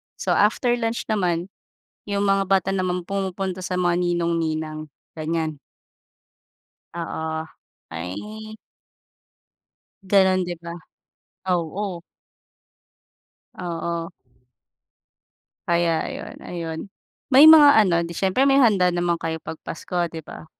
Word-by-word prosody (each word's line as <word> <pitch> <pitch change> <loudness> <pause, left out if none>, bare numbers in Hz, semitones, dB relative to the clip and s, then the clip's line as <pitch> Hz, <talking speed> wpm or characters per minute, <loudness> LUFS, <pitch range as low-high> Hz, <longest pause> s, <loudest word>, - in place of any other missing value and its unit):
So, - - -2
after 220 +4 +2
lunch 230 0 -2
naman, 180 -2 -1 0.6
'yong 200 0 0
mga 195 0 +3
bata 195 -1 +2
naman 180 -2 -1
pumupunta 190 -1 -3
sa 180 0 -3
mga 175 -1 +2
ninong, 170 -1 0
ninang 155 -1 -3 0.3
ganiyan. 160 -1 -3 1.4
Oo, 160 -1 -4 0.4
ay. 210 - -7 1.5
Gano'n 190 -1 +3
'di 175 0 -4
ba, 170 0 -6 0.8
oo. 175 +1 -3 1.5
Oo. 170 -1 -4 1.6
Kaya 170 -2 +1
ayun, - - -7
ayun. 165 -2 -5 0.5
May 295 +4 +10
mga 300 -2 +9
ano, 170 -4 +2
'di 170 - -7
siyempre 195 +10 +1
may 275 0 +5
handa 185 -7 +4
naman 175 -1 0
kayo 160 -1 -4
pag 160 - -7
Pasko 180 +2 -5 0.2
'di 160 - -6
ba? 155 - -11
175 Hz, 110 wpm, -23 LUFS, 165-195 Hz, 1.6 s, May